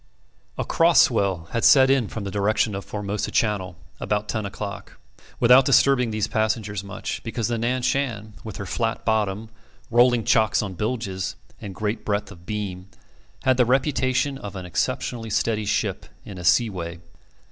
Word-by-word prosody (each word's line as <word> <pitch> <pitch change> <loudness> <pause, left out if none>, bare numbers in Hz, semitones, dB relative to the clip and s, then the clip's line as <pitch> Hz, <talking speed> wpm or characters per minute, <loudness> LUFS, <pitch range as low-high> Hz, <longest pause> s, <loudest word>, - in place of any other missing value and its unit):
A - - -2
cross 165 0 +4
swell 95 -8 +2
had 115 - -1
set 135 -2 +7
in 135 -5 +2
from 110 - -6
the 100 - -4
direction 105 +2 +1
of 95 0 -4
Formosa 105 0 -3
Channel 100 -5 0 0.2
about 105 0 -1
ten 110 -2 -2
o'clock, 100 0 -7 0.4
without 125 +2 +7
disturbing 135 -2 +4
these 110 -1 -1
passengers 110 -2 -1
much, 100 0 -5
because 115 0 -2
the 120 -1 -1
Nan 125 +2 -1
Shan, 115 -6 -1
with 110 -4 -7
her 100 - -5
flat 115 +4 -2
bottom, 110 -1 0 0.4
rolling 120 0 +4
chocks 110 -1 +3
on 95 -3 -5
bilges, 100 -2 -3 0.3
and 100 -2 -7
great 105 +1 -3
breadth 105 0 -2
of 90 -3 -15
beam, 100 -3 -4 0.6
had 130 -1 +3
the 125 - +4
reputation 130 +1 +1
of 105 -4 -8
an 90 -1 -6
exceptionally 115 +5 -2
steady 110 0 0
ship 100 - -1 0.2
in 95 -3 -8
a - - -7
sea 110 +6 +3
way. 85 -2 -6
110 Hz, 170 wpm, -24 LUFS, 100-120 Hz, 0.6 s, set